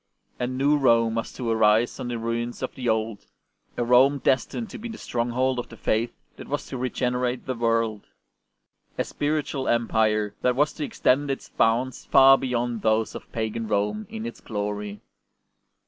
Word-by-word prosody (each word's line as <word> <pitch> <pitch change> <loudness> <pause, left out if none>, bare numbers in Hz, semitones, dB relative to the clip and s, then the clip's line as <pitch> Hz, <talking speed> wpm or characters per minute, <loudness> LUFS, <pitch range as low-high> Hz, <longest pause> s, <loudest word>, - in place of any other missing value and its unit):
A 125 - 0
new 135 +4 +2
Rome 115 -4 +3
was 115 0 -3
to 125 - -5
arise 110 +1 +3
on - - -4
the 120 -1 -3
ruins 115 +2 -3
of 130 - -3
the 125 -2 -2
old, 110 -1 -1 0.5
a 120 - +1
Rome 130 +4 +5
destined 180 - 0
to - - -7
be 235 - -6
the 225 - -7
stronghold 125 +2 -1
of 120 - -5
the 115 - -12
Faith 115 +3 0 0.3
that - - -9
was 145 +1 -3
to 130 - -4
regenerate 125 0 -1
the 130 - -2
world; 115 -3 0 0.9
a - - +1
spiritual 145 -2 -2
Empire 110 -3 +1
that 125 -1 +2
was 145 +3 +2
to 155 - -5
extend 140 +1 +1
its 135 - -4
bounds 120 +3 +1
far 135 0 +7
beyond 120 -3 -2
those 110 +1 +1
of - - -10
pagan 110 0 -3
Rome 105 - -1
in 225 0 -6
its 235 - -7
glory. 105 -1 -4
120 Hz, 175 wpm, -25 LUFS, 115-130 Hz, 0.9 s, far